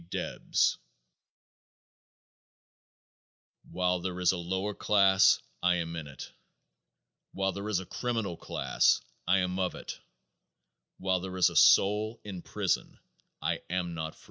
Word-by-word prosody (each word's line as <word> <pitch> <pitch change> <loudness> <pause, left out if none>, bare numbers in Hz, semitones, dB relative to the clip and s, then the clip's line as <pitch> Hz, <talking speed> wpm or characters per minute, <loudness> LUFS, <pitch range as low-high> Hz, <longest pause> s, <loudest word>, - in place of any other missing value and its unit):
Debs - - 0 2.9
While 90 0 0
there 90 0 -4
is 90 - +4
a 95 - -3
lower 95 +4 -2
class 100 -2 +4 0.2
I 90 0 +3
am 85 -1 -3
in 80 -3 -6
it; 70 -3 -10 1.0
While 95 0 0
there 100 +3 -5
is 100 -4 +1
a 95 - -7
criminal 115 -5 -3
class - - +1 0.3
I 95 +2 +4
am 90 +1 -1
of 90 -1 -1
it; - - -8 1.0
While 95 -1 0
there 95 0 -6
is 90 - +4
a - - -10
soul 105 +3 +4
in 95 -4 -7
prison - - -2 0.5
I - - -1
am 90 -1 -2
not 80 -1 -5
free. - - -22
95 Hz, 135 wpm, -29 LUFS, 90-100 Hz, 2.9 s, is